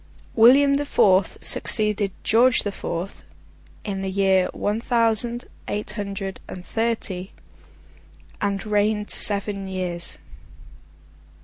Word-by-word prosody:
William 270 +5 +5
the 290 - -3
Fourth 190 -6 +2
succeeded 210 -2 +1
George 235 +2 +3
the 205 - -3
Fourth, 180 -1 -6 0.6
in 195 -2 -4
the 190 - -3
year 190 -1 +2
one 210 +2 -3
thousand 235 0 +1 0.2
eight 210 +1 -4
hundred 200 -2 -6
and 180 -1 -9
thirty, 220 -5 -3 1.1
and 200 0 -2
reigned 210 0 0
seven 200 -1 +3
years. 180 -2 -5
205 Hz, 105 wpm, -22 LUFS, 190-225 Hz, 1.1 s, William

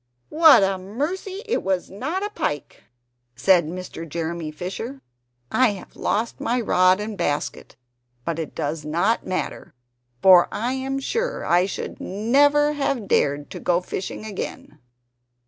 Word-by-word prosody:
"What 315 -8 +7
a 195 -1 +1
mercy 335 - -4
that 460 - 0
was 190 -2 -1
not 315 - -3
a 415 - -5
pike!" 145 - -4 0.5
said 170 +6 +4
Mr. 170 -1 -7
Jeremy 165 0 -3
Fisher. 195 - -6 0.5
"I 255 -5 +4
have 190 - -11
lost 225 +3 -1
my 245 +2 0
rod 185 -4 +4
and 210 0 -4
basket; 150 -6 -3 0.5
but 165 -1 -2
it 160 - -5
does 150 +1 -3
not 170 +9 +1
much - - -10
matter, 185 - -4 0.4
for 180 +2 +7
I 240 +4 -1
am 265 +1 -2
sure 470 - -2
I 175 +2 +3
should - - -6
never 285 +9 +3
have 275 -7 -1
dared 145 -3 +1
to - - -6
go 175 -1 +2
fishing 185 +3 -5
again!" 195 -6 -6
195 Hz, 145 wpm, -23 LUFS, 170-270 Hz, 0.5 s, What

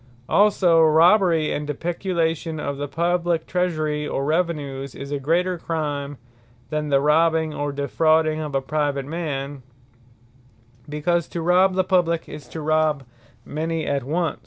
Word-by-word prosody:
Depeculation 120 0 -28
Also 190 -5 +4
Robbery, 165 +1 +4
and 150 0 -3
Depeculation 165 0 -2
of 140 -1 -3
the 145 +1 -3
Publique 170 +2 0
treasure, 155 -4 -1
or 135 - -2
Revenues, 145 -5 -2
is 140 +1 -8
a 145 - -1
greater 175 +5 0
Crime, 145 -4 -3 0.5
than 150 -1 -2
the 140 -1 +4
robbing, 160 +2 +2
or 145 0 -2
defrauding 155 +2 +1
of 150 -3 -4
a 135 - +2
Private 145 -1 -1
man; 145 -3 -4 1.3
because 165 +3 0
to 170 - -5
robbe 185 +2 +4
the 185 - +2
publique, 175 -3 +1
is 150 -2 -10
to 160 - -7
robbe 155 -2 +1 0.4
many 160 +1 -3
at 140 -2 -1
once. 165 +5 -1
155 Hz, 145 wpm, -23 LUFS, 145-170 Hz, 1.3 s, Also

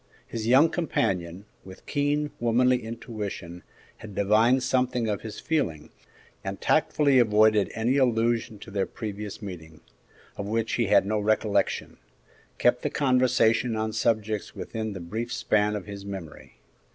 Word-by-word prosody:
His 115 -1 -5
young 135 +7 +5
companion, 95 - -1 0.2
with 95 0 -13
keen, 145 0 0
womanly 125 +2 +3
intuition, 105 -6 -6 0.4
had 105 -3 -11
divined 110 +6 +3
something 125 -3 0
of 105 -2 -2
his 110 -2 -7
feeling, 80 - -2 0.5
and - - -5
tactfully 140 -3 +3
avoiding 110 -2 +4
any 120 +5 +1
allusion 115 -3 +1
to 110 - -10
their 100 -1 -1
previous 105 -1 -6
meeting, 80 -5 -9 0.6
of 100 - -4
which 115 +1 -1
he 115 -3 +1
had 95 - +4
no 105 +1 0
recollection, 105 -1 0 0.6
kept - - +3
the - - -1
conversation 125 -4 +2
on 110 0 -2
subjects 110 -2 -1
within 110 -1 -4
the 95 - -6
brief 110 +8 -5
span 105 -2 +1
of 105 - -5
his 100 -1 -8
memory. 95 -10 -9
110 Hz, 140 wpm, -26 LUFS, 100-120 Hz, 0.6 s, young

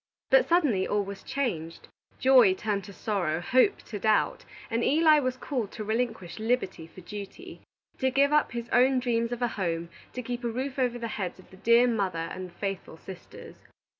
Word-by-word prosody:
But - - +5
suddenly 290 - +2
all 205 0 +1
was 200 0 -8
changed; 175 - -3 0.3
joy 250 -8 +6
turned 205 0 -2
to 200 - -10
sorrow, 185 -5 -1
hope 255 - +2
to 210 - -7
doubt, 215 +2 +1 0.3
and 230 +1 0
Eli 310 +1 +5
was 255 -2 -2
called 245 -6 -3
to 215 - -5
relinquish 220 -5 -2
liberty 215 -8 -1
for 185 - -14
duty, 210 - -9 0.4
to 260 - +2
give 280 +3 +3
up 300 - +3
his 235 0 -5
own 260 +2 +4
dreams 235 -2 0
of 245 0 -3
a - - +3
home, 170 -6 -3 0.2
to 250 - -5
keep 245 +1 -5
a - - 0
roof 260 +4 -3
over 245 -2 +1
the 235 -1 -4
heads 190 -5 -4
of 185 - -18
the 190 - -14
dear 235 +4 +5
mother 190 -8 -1
and 185 0 -6
the - - -21
faithful 195 -4 -5
sisters. 185 +2 -11
230 Hz, 195 wpm, -28 LUFS, 190-255 Hz, 0.4 s, joy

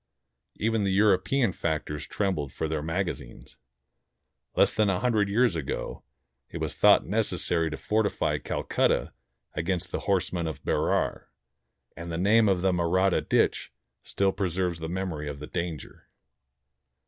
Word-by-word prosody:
Even 110 0 0
the 100 - +1
Euro 100 -1 +5
pean 120 +2 +1
factors 75 -4 -3
trembled 90 -9 -1
for 80 - -3
their 80 -1 -2
magazines. 80 -6 -4 1.0
Less - - +4
than 105 -2 +2
a 90 -2 +1
hundred 110 -5 +1
years 115 -1 +3
ago, 80 -5 -4 0.5
it - - -6
was - - -3
thought - - +5
necessary 80 -2 0
to 80 - -5
fortify 110 -1 0
Calcutta - - 0 0.4
against 85 +1 -2
the - - -2
horsemen 90 -3 0
of 80 -4 -6
Berar; - - 0 0.7
and 85 0 -7
the 80 - -2
name 105 +4 +4
of 95 -2 +1
the 95 - +3
Mahratta 90 +2 +2
ditch - - +1 0.3
still 100 -1 0
preserves 90 -3 -1
the 80 0 -5
memory 85 -5 -3
of 70 - -6
the 75 - -7
danger. 85 -3 -6
90 Hz, 145 wpm, -27 LUFS, 80-100 Hz, 1.0 s, Euro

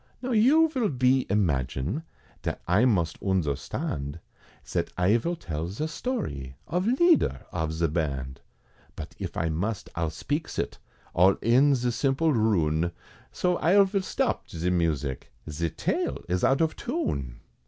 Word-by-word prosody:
Now 255 - -2
you 270 +9 +5
vill 260 -8 0
be 130 -1 +2
imagine, 80 - 0 0.4
Zat - - -2
I 100 +8 +4
must 85 -10 +1
oondherstand, 75 -5 -2 0.5
Zat - - -2
I 90 +5 +4
vill 170 +9 -2
tell 80 - -4
ze 105 - -3
story 155 - -4
Of 180 +5 0
leader 325 +8 +3
of 80 -3 -2
ze 80 +1 0
band, 70 -5 -2 0.5
But - - -8
if - - -5
I 80 - 0
must, 95 +7 -3
I'll 80 -1 0
speaks 145 - -3
it, - - -3 0.3
All 95 +3 +5
in 135 +5 +5
ze 125 -1 0
simple 135 +6 +1
rune, 85 - +1 0.4
So 180 -1 0
I 185 +5 +4
vill 195 0 0
stop - - -1
ze 85 +2 -1
music, 75 -7 -1 0.2
Ze 80 +2 -2
tale - - -2
is 90 +1 -1
out 135 +4 +3
of 160 -1 +1
tune! 70 - -3
100 Hz, 150 wpm, -27 LUFS, -, 0.5 s, you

